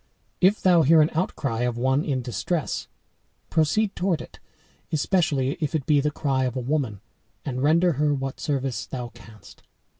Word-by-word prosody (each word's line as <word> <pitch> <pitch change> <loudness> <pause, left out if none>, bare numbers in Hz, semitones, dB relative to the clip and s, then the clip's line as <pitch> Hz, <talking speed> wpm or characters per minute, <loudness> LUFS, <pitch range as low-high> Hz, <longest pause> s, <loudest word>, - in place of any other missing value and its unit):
If 190 +3 +4
thou 180 -3 +5
hear 160 +2 +5
an 150 - 0
outcry 140 -8 -1
of 120 -1 -1
one 130 +4 +1
in 130 -4 -2
distress, 125 - -2 0.6
proceed 195 +7 +1
toward 180 -3 0
it, - - -11 0.5
especially 150 -5 +1
if 155 0 -2
it 145 -4 -1
be 145 -2 +3
the 150 - +1
cry 135 -3 0
of 125 0 -3
a - - -1
woman, 125 -6 -2 0.4
and 130 -2 -3
render 165 +5 +4
her 150 0 +1
what 135 -1 -3
service 135 -3 -2
thou 125 -2 -5
canst. 115 -3 -16
145 Hz, 170 wpm, -24 LUFS, 130-160 Hz, 0.6 s, thou